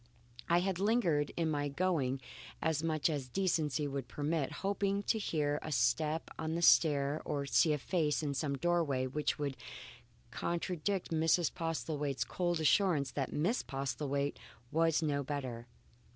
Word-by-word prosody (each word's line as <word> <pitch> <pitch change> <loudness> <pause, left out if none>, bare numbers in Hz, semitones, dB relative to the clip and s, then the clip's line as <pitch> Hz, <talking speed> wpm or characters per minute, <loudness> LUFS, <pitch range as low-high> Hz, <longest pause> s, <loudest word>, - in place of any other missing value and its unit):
I 170 +1 +4
had 190 -1 -1
lingered 190 -9 +2
in 165 -2 +1
my 145 -1 0
going 140 -5 0 0.4
as 160 -2 0
much 155 -2 +1
as 145 -5 -2
decency 155 -5 0
would 135 -3 -4
permit, 145 +2 -1
hoping 200 0 0
to 220 - +1
hear 150 -6 0
a 155 - -6
step 155 +2 +1
on 160 0 -2
the 170 - -1
stair 145 -3 +4
or 140 -1 -2
see 155 +3 +4
a 150 - +2
face 155 0 0
in 145 -2 -1
some 140 0 -1
doorway 155 -5 +1
which 150 +3 -1
would 145 -3 -2 0.8
contradict 175 +4 -2
Mrs. 165 0 +2
Postlethwaite's 150 -4 -2
cold 175 -2 -1
assurance 155 -4 +3
that 135 -3 -2
Miss 180 - +1
Postlethwaite 140 +1 -2 0.3
was 165 0 +2
no 145 -2 0
better. 130 -4 -4
155 Hz, 150 wpm, -33 LUFS, 140-170 Hz, 0.8 s, I